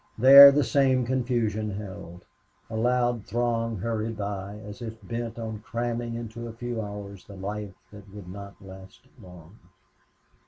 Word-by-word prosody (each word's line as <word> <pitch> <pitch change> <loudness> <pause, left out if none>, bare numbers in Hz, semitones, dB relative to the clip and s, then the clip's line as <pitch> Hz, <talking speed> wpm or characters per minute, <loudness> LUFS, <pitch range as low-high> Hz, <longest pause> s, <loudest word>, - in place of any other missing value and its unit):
There 140 +4 +11
the 145 +1 +2
same 130 -3 +2
confusion 120 -4 -1
held. 95 -4 -8 0.5
A - - -4
loud 120 0 +1
throng 115 -1 -1
hurried 110 +2 -3
by, 100 0 -5
as 105 +1 -10
if 115 -1 -6
bent 115 -1 -5
on 110 -2 -5
cramming 120 +1 -4
into 115 0 -7
a 115 - -8
few 120 0 -4
hours 100 -2 -8
the 100 - -12
life 100 0 -6 0.2
that 100 -1 -14
would 100 -3 -11
not 100 +2 -9
last 95 0 -13 0.2
long. 90 +2 -15
110 Hz, 150 wpm, -26 LUFS, 100-120 Hz, 0.5 s, There